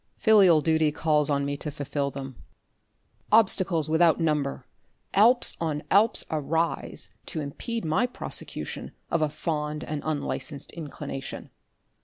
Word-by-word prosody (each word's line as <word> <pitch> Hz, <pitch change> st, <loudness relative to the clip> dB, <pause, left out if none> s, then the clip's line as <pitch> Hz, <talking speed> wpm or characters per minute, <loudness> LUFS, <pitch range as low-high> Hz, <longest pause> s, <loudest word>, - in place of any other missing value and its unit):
Filial 195 Hz, -8 st, +6 dB
duty 160 Hz, -1 st, +2 dB
calls 150 Hz, -1 st, +2 dB
on 140 Hz, -1 st, +1 dB
me 140 Hz, 0 st, -2 dB
to 150 Hz, -, -5 dB
fulfil 145 Hz, -1 st, -3 dB
them. 135 Hz, -1 st, -7 dB, 1.0 s
Obstacles 185 Hz, -7 st, +3 dB
without 160 Hz, +1 st, +3 dB
number, 150 Hz, -5 st, -1 dB, 0.5 s
Alps 240 Hz, +5 st, +5 dB
on 155 Hz, -3 st, -2 dB
Alps 210 Hz, +4 st, +4 dB
arise, 160 Hz, +2 st, -1 dB, 0.2 s
to -, -, -4 dB
impede 220 Hz, -, -4 dB
my 190 Hz, +10 st, +1 dB
prosecution 245 Hz, -, -4 dB, 0.2 s
of 170 Hz, -, +1 dB
a 155 Hz, -, +2 dB
fond 150 Hz, 0 st, -3 dB
and 150 Hz, -1 st, -4 dB
unlicensed 145 Hz, -1 st, -3 dB
inclination. 145 Hz, -3 st, -7 dB
155 Hz, 125 wpm, -26 LUFS, 145-170 Hz, 1.0 s, Filial